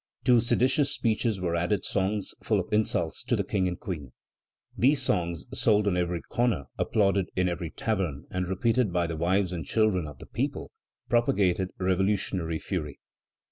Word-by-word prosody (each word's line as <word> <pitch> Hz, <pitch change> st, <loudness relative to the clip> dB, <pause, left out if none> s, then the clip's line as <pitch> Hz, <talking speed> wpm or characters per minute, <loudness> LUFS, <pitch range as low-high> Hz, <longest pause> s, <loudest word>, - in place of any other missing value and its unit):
To 125 Hz, -2 st, +5 dB
seditious 130 Hz, +5 st, +2 dB
speeches 115 Hz, -5 st, 0 dB
were 85 Hz, -2 st, -1 dB
added 90 Hz, +3 st, 0 dB
songs 100 Hz, +1 st, -1 dB
full -, -, +1 dB
of -, -, -5 dB
insults 105 Hz, 0 st, 0 dB
to -, -, +1 dB
the -, -, 0 dB
King 95 Hz, -3 st, 0 dB
and 90 Hz, -1 st, -4 dB
Queen. 80 Hz, -, -6 dB, 0.6 s
These 135 Hz, +2 st, +3 dB
songs, 85 Hz, -7 st, 0 dB
sold 105 Hz, -1 st, +3 dB
on 95 Hz, -, +2 dB
every 90 Hz, -1 st, -1 dB
corner, 120 Hz, -, 0 dB, 0.2 s
applauded 100 Hz, -4 st, +2 dB
in 90 Hz, 0 st, +2 dB
every 85 Hz, -2 st, -3 dB
tavern, 90 Hz, -9 st, -2 dB
and 90 Hz, -1 st, -2 dB
repeated 115 Hz, +4 st, +1 dB
by 85 Hz, -1 st, +1 dB
the 85 Hz, -1 st, -3 dB
wives 90 Hz, +3 st, +1 dB
and 85 Hz, -3 st, -4 dB
children 105 Hz, -7 st, +1 dB
of 75 Hz, -3 st, -10 dB
the -, -, -11 dB
people, -, -, -3 dB, 0.4 s
propagated 95 Hz, -6 st, +2 dB
revolutionary 95 Hz, -3 st, 0 dB
fury. 75 Hz, -6 st, -4 dB
95 Hz, 165 wpm, -27 LUFS, 85-110 Hz, 0.6 s, To